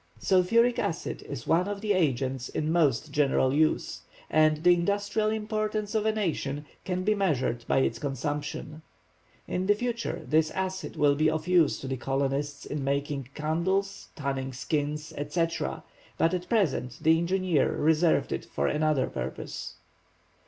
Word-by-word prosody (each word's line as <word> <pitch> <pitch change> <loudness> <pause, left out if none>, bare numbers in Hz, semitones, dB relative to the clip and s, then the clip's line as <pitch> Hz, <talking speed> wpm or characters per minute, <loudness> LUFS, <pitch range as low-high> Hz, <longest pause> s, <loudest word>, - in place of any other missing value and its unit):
Sulphuric 230 +7 +3
acid 165 - -3
is 130 -5 -6
one 175 +4 +2
of 205 -1 -3
the 210 -1 +1
agents 135 -7 0
in 155 +1 -1
most 150 -3 +2
general 135 -2 +2
use, 155 +2 +1 0.3
and 155 0 +3
the 180 0 +7
industrial 205 +4 0
importance 215 -1 -2
of 220 -1 +1
a - - +4
nation 150 -8 -2 0.2
can 180 0 -2
be 215 +2 +3
measured 145 - 0
by - - +2
its 115 -3 +1
consumption. 145 +3 -4 0.7
In 185 +1 -2
the 205 - +5
future 235 +1 -3
this 155 0 +3
acid 190 0 -3
would 145 -1 +3
be 155 0 +4
of 155 +1 -2
use 175 -5 +4
to 135 - -5
the 130 0 -2
colonists 140 +2 -2
in 145 -2 -4
making 140 -1 -2
candles, 190 +6 -1
tanning 135 -2 -3
skins, 150 +4 -2
etc., 150 - -2 0.3
but 165 - +2
at 180 0 -3
present 150 - +1
the 160 +1 +5
engineer 180 -3 +1
reserved 160 +2 +2
it - - -3
for 70 - -2
another 150 - +2
purpose. 65 +2 -6
155 Hz, 150 wpm, -28 LUFS, 140-190 Hz, 0.7 s, the